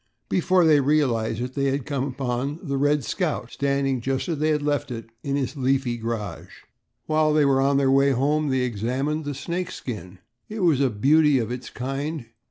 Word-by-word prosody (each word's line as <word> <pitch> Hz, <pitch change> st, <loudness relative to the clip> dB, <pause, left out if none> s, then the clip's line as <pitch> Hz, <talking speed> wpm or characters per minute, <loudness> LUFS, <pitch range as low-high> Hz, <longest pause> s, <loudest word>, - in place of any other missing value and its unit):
Before 185 Hz, -1 st, +3 dB
they 155 Hz, -2 st, +6 dB
realized 130 Hz, -6 st, +1 dB
it 125 Hz, +1 st, -4 dB
they 140 Hz, 0 st, -1 dB
had 135 Hz, -1 st, 0 dB
come 140 Hz, -2 st, -2 dB
upon 130 Hz, +1 st, -3 dB
the 140 Hz, -5 st, -2 dB
"Red 145 Hz, 0 st, +2 dB
Scout" -, -, -2 dB
standing 140 Hz, -2 st, 0 dB
just 135 Hz, +2 st, -2 dB
as 165 Hz, -4 st, -2 dB
they 155 Hz, +1 st, +1 dB
had 150 Hz, -1 st, +1 dB
left 145 Hz, -1 st, 0 dB
it 115 Hz, -2 st, -7 dB
in 140 Hz, +1 st, -1 dB
its 135 Hz, 0 st, -2 dB
leafy 135 Hz, -2 st, 0 dB
garage. 110 Hz, -6 st, -6 dB, 0.4 s
While 155 Hz, -1 st, +2 dB
they 150 Hz, -1 st, +4 dB
were 135 Hz, -1 st, +3 dB
on 140 Hz, +1 st, +3 dB
the 135 Hz, -1 st, +3 dB
way 135 Hz, +1 st, +4 dB
home 145 Hz, +3 st, +1 dB
they 130 Hz, -1 st, +1 dB
examined 125 Hz, +7 st, -2 dB
the 145 Hz, -1 st, -3 dB
snake 170 Hz, +6 st, -3 dB
skin. 95 Hz, -7 st, -7 dB, 0.3 s
It 215 Hz, -1 st, -5 dB
was 160 Hz, -7 st, +3 dB
a 135 Hz, -, +3 dB
beauty 145 Hz, +6 st, +4 dB
of 115 Hz, -2 st, -2 dB
its 125 Hz, +1 st, -6 dB
kind. 135 Hz, +2 st, -4 dB
140 Hz, 195 wpm, -24 LUFS, 125-150 Hz, 0.4 s, they